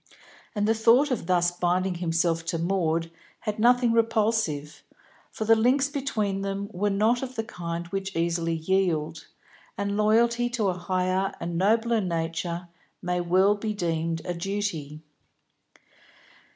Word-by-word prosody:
And 205 Hz, 0 st, +1 dB
the 225 Hz, -, +4 dB
thought 235 Hz, +6 st, +4 dB
of 220 Hz, -9 st, -2 dB
thus 175 Hz, -1 st, +3 dB
binding 180 Hz, +1 st, 0 dB
himself 165 Hz, -1 st, 0 dB
to 165 Hz, -, -2 dB
Maud 165 Hz, -2 st, 0 dB, 0.3 s
had 210 Hz, -1 st, -3 dB
nothing 245 Hz, +1 st, +4 dB
repulsive, 220 Hz, -10 st, 0 dB, 0.5 s
for 220 Hz, -, -5 dB
the 225 Hz, +1 st, +6 dB
links 260 Hz, +5 st, +2 dB
between 220 Hz, -9 st, -2 dB
them 200 Hz, +1 st, -3 dB
were 205 Hz, +3 st, 0 dB
not 215 Hz, +5 st, +2 dB
of 260 Hz, -1 st, -6 dB
the 225 Hz, -, -2 dB
kind 170 Hz, -5 st, -5 dB
which 195 Hz, +1 st, -4 dB
easily 165 Hz, 0 st, 0 dB
yield, 160 Hz, -2 st, -1 dB, 0.5 s
and 200 Hz, 0 st, -1 dB
loyalty 235 Hz, +3 st, +3 dB
to 225 Hz, -5 st, 0 dB
a -, -, 0 dB
higher 185 Hz, +2 st, -1 dB
and 170 Hz, 0 st, -4 dB
nobler 225 Hz, +5 st, +2 dB
nature 170 Hz, 0 st, -3 dB, 0.4 s
may 180 Hz, 0 st, 0 dB
well 185 Hz, +4 st, +4 dB
be 210 Hz, +1 st, -3 dB
deemed 165 Hz, -3 st, -2 dB
a 180 Hz, -, -2 dB
duty. 170 Hz, -5 st, -4 dB
190 Hz, 140 wpm, -26 LUFS, 170-220 Hz, 0.5 s, the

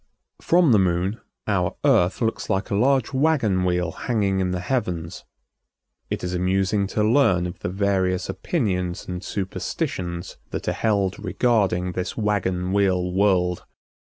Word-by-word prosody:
From 170 Hz, -4 st, +4 dB
the 105 Hz, -, +6 dB
Moon 95 Hz, +3 st, 0 dB, 0.2 s
our 90 Hz, -4 st, 0 dB
Earth 90 Hz, +6 st, +3 dB
looks 115 Hz, -1 st, -1 dB
like 95 Hz, -1 st, -1 dB
a -, -, +1 dB
large 130 Hz, +4 st, +2 dB
wagon 130 Hz, -10 st, +2 dB
wheel 90 Hz, -2 st, 0 dB
hanging 100 Hz, -2 st, -1 dB
in 95 Hz, -1 st, 0 dB
the 90 Hz, 0 st, -2 dB
heavens. 90 Hz, -5 st, -3 dB, 0.8 s
It -, -, -3 dB
is 90 Hz, 0 st, -2 dB
amusing 95 Hz, +2 st, +1 dB
to 105 Hz, +2 st, -1 dB
learn 105 Hz, -6 st, +3 dB
of 90 Hz, -, -6 dB
the -, -, -3 dB
various 95 Hz, -1 st, 0 dB
opinions 90 Hz, -, -2 dB
and 90 Hz, 0 st, -5 dB
superstitions 90 Hz, -2 st, -4 dB
that -, -, -5 dB
are -, -, +2 dB
held 100 Hz, -3 st, 0 dB
regarding 95 Hz, -3 st, +1 dB
this 90 Hz, 0 st, -4 dB
wagon 95 Hz, -4 st, 0 dB
wheel 90 Hz, -3 st, +1 dB
world. 90 Hz, -2 st, +2 dB
95 Hz, 145 wpm, -23 LUFS, 90-105 Hz, 0.8 s, the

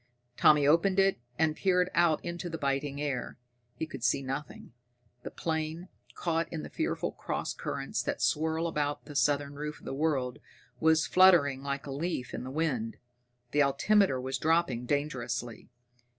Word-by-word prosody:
Tommy 150 Hz, +1 st, +5 dB
opened 170 Hz, +6 st, +4 dB
it, 195 Hz, -6 st, +3 dB, 0.2 s
and 160 Hz, -1 st, +2 dB
peered 180 Hz, 0 st, +2 dB
out 170 Hz, -2 st, +2 dB
into 175 Hz, 0 st, -4 dB
the 165 Hz, -, -4 dB
biting 140 Hz, 0 st, -1 dB
air. 140 Hz, -4 st, -3 dB, 0.4 s
He -, -, -3 dB
could 135 Hz, -6 st, -9 dB
see 135 Hz, -, +2 dB
nothing.... 135 Hz, -1 st, -6 dB, 0.5 s
The -, -, -6 dB
plane, 160 Hz, +2 st, -3 dB, 0.3 s
caught 165 Hz, -1 st, -1 dB
in 160 Hz, -2 st, -4 dB
the -, -, -8 dB
fearful -, -, -2 dB
cross -, -, -4 dB
currents -, -, -3 dB
that -, -, -3 dB
swirl 160 Hz, +2 st, +1 dB
about 145 Hz, -3 st, -2 dB
the 145 Hz, -, -10 dB
southern 145 Hz, 0 st, +1 dB
roof 150 Hz, +1 st, -5 dB
of -, -, -17 dB
the -, -, -4 dB
world, 135 Hz, -4 st, -1 dB, 0.4 s
was 160 Hz, -1 st, +4 dB
fluttering 170 Hz, -8 st, +5 dB
like 140 Hz, 0 st, -3 dB
a 140 Hz, -, -6 dB
leaf 140 Hz, -3 st, -3 dB
in -, -, -4 dB
the 130 Hz, -, -6 dB
wind. 130 Hz, -7 st, -1 dB, 0.5 s
The 145 Hz, -, +3 dB
altimeter 140 Hz, +3 st, +3 dB
was 130 Hz, 0 st, -3 dB
dropping 155 Hz, -7 st, +1 dB
dangerously. 120 Hz, -6 st, -3 dB
150 Hz, 165 wpm, -30 LUFS, 135-165 Hz, 0.5 s, Tommy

